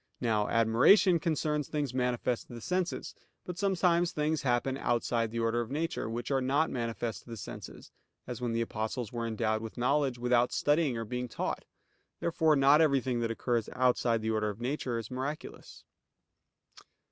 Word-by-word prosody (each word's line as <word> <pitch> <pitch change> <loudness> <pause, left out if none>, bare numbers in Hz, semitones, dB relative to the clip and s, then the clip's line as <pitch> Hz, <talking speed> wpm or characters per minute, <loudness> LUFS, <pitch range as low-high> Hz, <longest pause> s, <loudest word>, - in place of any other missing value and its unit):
Now 110 -4 +1
admiration 125 - +5
concerns 150 -2 -1
things 145 -4 -2
manifest 125 -1 -1
to 120 - -10
the - - -7
senses. 180 +5 -2 0.3
But 180 -1 -6
sometimes 180 -3 +2
things 155 -2 0
happen 130 +1 +1
outside 115 -2 0
the 115 - -6
order 115 +1 +1
of 115 - -5
nature, 155 -5 -2
which 120 +4 -4
are 135 -1 +2
not 140 +5 +1
manifest 115 -2 -3
to - - -18
the 115 - -6
senses; 100 - -9 0.3
as 125 0 -6
when 120 -1 -1
the 115 0 0
Apostles 110 +1 -3
were 115 -1 -2
endowed 110 -1 0
with 115 +1 -8
knowledge 135 +1 +1
without 125 0 +2
studying 145 -4 +2
or 115 - -3
being 125 +3 -3
taught. 115 - -3 0.5
Therefore 160 -2 +2
not 140 +3 +6
everything 130 -5 +2
that 115 -1 -1
occurs 115 0 -1
outside 125 -3 +2
the 110 - 0
order 105 -1 0
of 105 +1 -7
nature 125 -1 -2
is 115 0 -6
miraculous. 135 +4 -6
125 Hz, 170 wpm, -30 LUFS, 115-150 Hz, 0.5 s, not